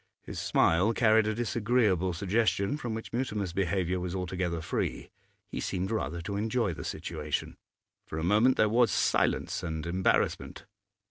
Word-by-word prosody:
His - - -6
smile 95 +8 +3
carried 110 -2 +4
a 110 - 0
disagreeable 110 -5 +1
suggestion 100 - +1
from 120 -7 -4
which 110 - -7
Mutimer's 105 -7 -2
behaviour 95 -1 0
was 90 0 -4
altogether 90 -2 -2
free; 80 - -3 0.4
he - - -7 0.2
rather 95 -2 -2
seemed - - -13
to 100 +1 -3
enjoy 110 -2 0
the - - -7
situation. - - -4 0.5
For 80 - -5
a 80 - -2
moment 105 +8 +4
there 110 - +4
was 115 +2 +3
silence - - +1
and 80 -3 -4
embarrassment. 90 +2 0
100 Hz, 150 wpm, -29 LUFS, 90-110 Hz, 0.5 s, carried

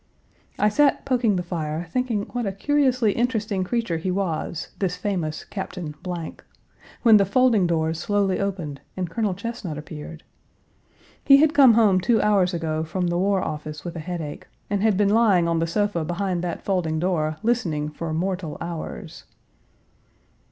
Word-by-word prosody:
I 210 - +3
sat 285 +6 +2
poking 240 -6 +2
the 180 - -1
fire 165 -1 -4
thinking 240 -3 0
what 245 -3 -2
a - - 0
curiously 255 +1 +2
interesting 220 -4 -1
creature 225 -3 -1
he 185 - -3
was, 175 -3 -2
this 185 -3 0
famous 180 -5 -3
Captain, 180 -5 -6 1.1
when 225 -3 +8
the 200 - +4
folding 215 -1 +3
doors 160 -1 0
slowly 200 -1 0
opened 175 -8 -3 0.2
and 180 -3 -3
Colonel 210 -2 -1
Chesnut 200 -7 -5
appeared. 155 +1 -9 1.0
He 275 -1 +8
had 305 +1 +4
come 265 -6 +7
home 205 -5 +4
two 230 +4 +3
hours 195 -4 +3
ago 160 -2 -2
from 175 +2 -2
the 175 - 0
War 195 0 +1
Office 150 0 -6
with 175 0 -5
a - - -4
headache, 160 -3 -6 0.2
and 200 -1 +1
had 215 -3 +3
been 205 -1 +3
lying 205 -7 +4
on 165 -1 +1
the 165 - 0
sofa 205 -1 0
behind 175 +1 -2
that 175 -2 -4
folding 175 -5 0
door 155 -3 0
listening 175 -11 0
for 160 +2 -5
mortal 175 -1 -2
hours. 170 -1 -7
185 Hz, 160 wpm, -24 LUFS, 165-210 Hz, 1.1 s, when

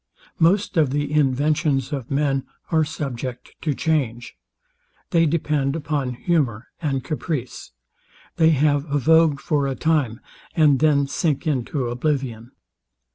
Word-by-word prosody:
Most 185 +3 +2
of 155 -4 +4
the 145 +1 -2
inventions 145 0 +1
of 135 -4 -4
men 135 -1 0 0.3
are 160 -1 +3
subject 130 -5 -5
to 150 -3 -1
change. 125 -8 -1 0.8
They 165 -2 +4
depend 145 -3 0
upon 145 -5 -2
humour 125 - -1
and 135 -5 -1
caprice. 145 - -4 0.7
They 160 -1 +5
have 145 -1 +2
a 145 - +2
vogue 160 0 +4
for 145 -3 0
a 135 - -2
time, 135 -6 0 0.4
and 150 -5 +4
then 150 -2 +3
sink 140 0 -1
into 135 -2 -1
oblivion. 125 -2 -2
145 Hz, 130 wpm, -22 LUFS, 130-155 Hz, 0.8 s, They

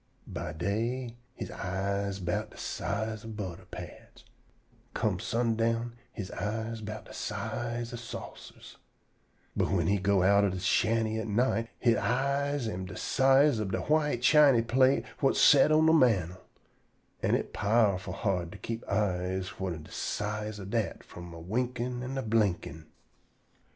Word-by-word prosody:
By - - -5
day 115 +7 -2 0.2
he - - -6
eyes 100 +1 -2
'bout 90 -1 -2
de - - -16
size 110 -1 -3
ob 110 -2 -8
butter 95 -5 -6
pats, - - -10 0.5
an' - - -31 0.2
come - - 0
sundown 115 0 0 0.2
he 110 - -5
eyes 110 +2 -3
'bout 110 0 -6
de - - -12
size 120 0 -4
ob 120 - -5
saucers; 115 - -10 0.8
but - - +2
whin 90 -4 +1
he 100 +3 +2
go 100 -1 +2
outer 100 +1 +5
de 95 - -4
shanty 110 +3 +1
at 110 - -4
night, 115 +1 +1
he 120 -2 +3
eyes 140 +3 0
am 95 -3 -4
de 95 - -8
size 135 -2 +4
ob 95 -3 -3
de - - 0
white 150 -5 +1
chiny 140 -4 +6
plate 130 +3 +3
whut 135 - +3
set 145 +1 +6
on 155 +1 +5
de 160 - +5
mantel; 95 - +3 0.8
an' - - +2
it - - -3
powerful 100 -3 +2
hard 90 -4 -1
to - - -9
keep 115 0 -5
eyes 95 -2 0
whut 95 -1 -2
am 80 - -9
de - - -15
size 105 0 -3
ob 100 0 -7
dat 115 -4 -1
from 85 0 -10
a 85 - -9
winkin' 120 +6 -2
an' 130 +2 -4
a 135 - -1
blinkin'. 100 -7 0
110 Hz, 160 wpm, -30 LUFS, 95-120 Hz, 0.8 s, chiny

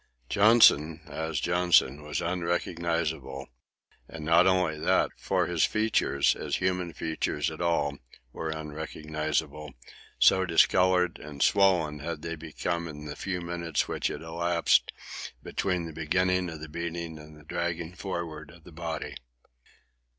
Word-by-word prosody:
Johnson, 100 -8 +5
as 80 0 -3
Johnson, 85 -5 +3
was 75 0 -3
unrecognizable; 85 -5 -2 0.6
and 80 -2 -8
not 85 +3 +5
only 90 -5 +2
that, - - +2
for - - 0
his 85 -3 +1
features, 105 -10 +2
as - - -3
human 90 -2 -1
features 80 -1 -2
at 80 - -8
all, 75 -5 0 0.3
were 80 - -4
unrecognizable, 75 -1 -4 0.4
so 95 - +5
discoloured 90 0 +3
and 70 -2 -3
swollen 90 -7 +3
had 75 0 -5
they 85 0 -3
become 85 +2 -3
in 75 -1 -8
the 75 - -6
few 95 -2 -3
minutes 85 -2 -2
which - - -1
had - - -5
elapsed 85 +1 +2 0.5
between 90 -3 -1
the 80 - -7
beginning 90 +3 +1
of 80 -2 -8
the 80 - -6
beating 85 0 -5
and 75 0 -13
the 75 - -16
dragging 85 +1 -3
forward 85 -6 -5
of 85 0 -16
the 90 - -13
body. 80 -1 -5
85 Hz, 135 wpm, -28 LUFS, 75-90 Hz, 0.6 s, Johnson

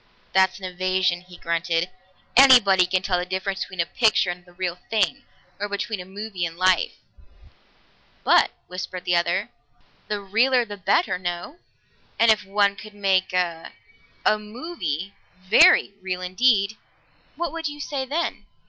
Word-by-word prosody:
"That's 190 0 +3
an 190 - -8
evasion," 185 -1 0
he 180 -1 -15
grunted. 170 +1 -1 0.4
"Anybody 220 -9 +7
can 185 0 0
tell 180 -3 0
the - - -2
difference 190 +1 -3
between 185 - -6
a - - 0
picture 215 -2 +2
and 175 0 -9
the 175 - -20
real 180 0 -4
thing, 225 +5 0 0.3
or 205 0 -3
between 205 +1 -3
a 180 - -7
movie 195 -1 -6
and 165 -1 -3
life." 185 -1 +2 1.3
"But," - - +5 0.2
whispered 180 0 -7
the 180 - +2
other, 170 0 0 0.6
"the 210 -1 -2
realer 235 +5 +2
the 205 -2 -8
better, 200 - +1
no? 175 - -5 0.6
And 230 -1 +5
if 215 - +1
one 200 +1 +1
could 210 +1 -12
make 190 -2 +1
a 175 -3 -2 0.5
a 215 - +3
movie 210 - -5 0.3
very 190 +1 +5
real 185 -1 -4
indeed, 200 +2 +2 0.6
what 345 0 -3
would 330 -1 -3
you 295 0 -7
say 280 -2 -3
then?" 300 +6 -3
190 Hz, 155 wpm, -23 LUFS, 180-215 Hz, 1.3 s, Anybody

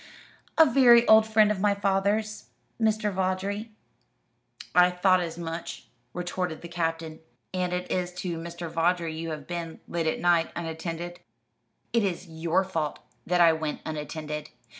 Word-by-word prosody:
"A 320 - +8
very 240 -3 +6
old 220 0 +7
friend 215 -1 +4
of 205 - -2
my 205 +1 +2
father's 200 +2 0 0.4
Mr. 215 -2 +1
Vawdrey." 190 +4 -2 1.0
"I 180 0 +6
thought 185 +1 +3
as 170 -2 -4
much," 165 0 -6 0.2
retorted 180 -2 -4
the - - -6
Captain. 165 -2 -3 0.3
"And 180 -1 -1
it 180 0 -3
is 180 -1 -1
to 180 -2 -4
Mr. 170 +1 -6
Vawdrey 165 0 0
you 165 +1 -4
have 150 -2 -6
been, 170 -2 -5
late 170 -1 -2
at 160 - 0
night, 170 -1 +3
unattended?" 170 +1 -5 0.7
"It 230 -2 +3
is 185 -1 -2
your 165 +3 0
fault 165 -6 -3 0.3
that 180 0 +3
I 165 -1 +7
went 160 -1 -3
unattended. 150 0 -5
175 Hz, 150 wpm, -27 LUFS, 165-195 Hz, 1.0 s, A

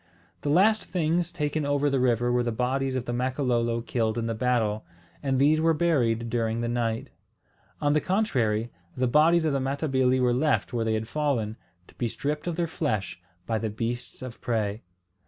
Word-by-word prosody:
The 145 - -2
last 205 +8 +4
things 170 -1 0
taken 150 -1 -1
over 145 0 +1
the 135 -2 +1
river 120 -1 +2
were 125 0 +2
the 120 -1 -1
bodies 130 +3 -1
of 125 -2 -2
the 120 - -3
Makololo 120 -2 0
killed 115 -1 -1
in 115 - -1
the 115 - -1
battle; 110 -2 0 0.4
and 135 -2 0
these 150 +4 +4
were 165 0 +3
buried 120 -9 +1
during 115 0 -1
the 120 - -1
night. 120 +2 -2 0.7
On 145 0 +2
the 150 - +2
contrary, 120 - 0 0.3
the 130 - +2
bodies 160 +6 +4
of 155 - +1
the 140 - +1
Matabili 130 -2 +1
were 125 -1 +3
left 145 +1 +1
where 115 -2 0
they 110 0 +1
had 110 0 -3
fallen, 120 -6 -1 0.3
to - - -19
be 120 - -2
stripped 150 +7 -3
of 170 - -1
their 170 - 0
flesh 105 - -2 0.2
by 110 -1 -1
the 110 - -2
beasts 115 +4 -4
of 125 -3 -8
prey. 110 -2 -1
125 Hz, 190 wpm, -27 LUFS, 115-145 Hz, 0.7 s, last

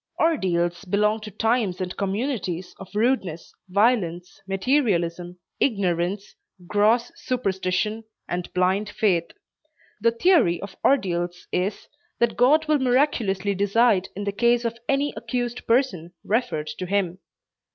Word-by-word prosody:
Ordeals 180 - +1
belong 210 +3 +1
to 215 0 -8
times 220 -3 0
and 185 -1 -4
communities 195 - -2
of 195 - -10
rudeness, 210 -8 0 0.2
violence, 185 -4 +1
materialism, 185 -6 0 0.2
ignorance, 195 -3 0 0.3
gross 215 +5 +2
superstition 210 -2 -1 0.2
and 175 0 -4
blind 190 +3 +1
faith. 185 -6 +1 0.7
The 230 - +5
theory 230 - +3
of 200 -1 -8
ordeals 175 -8 0
is, 190 +3 -2 0.3
that 235 -1 +1
God 300 +6 +4
will 305 -1 +3
miraculously 240 -7 +1
decide 200 0 +2
in 205 - -4
the 200 - -1
case 235 +3 +2
of 230 0 -3
any 280 +1 +1
accused 240 +2 -4
person 220 - +1
referred 155 -9 -1
to 185 - -3
Him. 185 -2 0
200 Hz, 120 wpm, -24 LUFS, 180-240 Hz, 0.7 s, The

